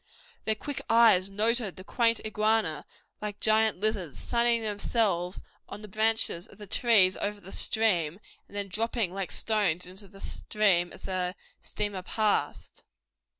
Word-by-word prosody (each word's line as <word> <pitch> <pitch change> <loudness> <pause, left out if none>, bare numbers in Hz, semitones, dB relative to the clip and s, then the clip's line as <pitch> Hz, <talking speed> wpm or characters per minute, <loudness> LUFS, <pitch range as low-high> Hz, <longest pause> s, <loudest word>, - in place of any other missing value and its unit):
Their 220 - +1
quick 285 +6 -6
eyes 225 -5 +5
noted 215 0 +1
the 185 - -11
quaint 230 +2 +1
iguana, 215 -5 +1 0.4
like 210 -1 -5
giant 220 -2 +3
lizards, 200 -8 -2
sunning 235 -1 +1
themselves 205 -4 0 0.3
on 210 - -8
the - - -7
branches 215 -4 +1
of - - -18
the 210 - -10
trees 200 -3 +4
over 205 0 -3
the 195 0 -12
stream 185 -6 +2 0.3
and 205 - -10
then 200 -1 -2
dropping 220 -1 -2
like 195 -1 -4
stones 200 -6 0
into 190 +3 -10
the 195 +1 -16
stream 190 -6 0
as - - -12
the 185 -1 -2 0.3
steamer 205 -3 -4
passed. 215 +3 -1
210 Hz, 150 wpm, -28 LUFS, 185-220 Hz, 0.4 s, eyes